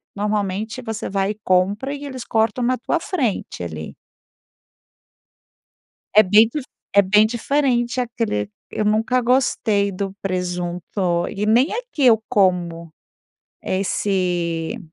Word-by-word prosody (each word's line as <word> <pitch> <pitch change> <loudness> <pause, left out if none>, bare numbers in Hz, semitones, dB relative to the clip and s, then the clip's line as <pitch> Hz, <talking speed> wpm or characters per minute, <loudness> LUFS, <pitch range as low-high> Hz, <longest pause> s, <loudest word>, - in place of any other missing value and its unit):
normalmente, 210 +2 -2
você 225 -2 -5
vai 195 0 0
e 215 - -9
compra 200 +9 +1
e 285 - -7
eles 260 -3 -6
cortam 225 +2 +1
na 255 +2 +2
tua 255 +7 -1
frente 265 - -2
ali. 80 -2 -6 2.2
É 215 - +9
bem 210 +3 +5
cur 295 +3 -4 0.3
é 200 - +8
bem 210 +2 +4
diferente 240 0 0
aquele 230 - -2 0.2
eu 215 - -2
nunca 225 +4 +2
gostei 230 -5 +2
do 195 0 -4
presunto 180 -1 -2
e 210 +1 -3
nem 245 - +3
aqui 480 - -3
eu 220 -2 +5
como, 175 -4 +1 0.7
esse 180 -4 -1
210 Hz, 120 wpm, -21 LUFS, 185-240 Hz, 2.2 s, É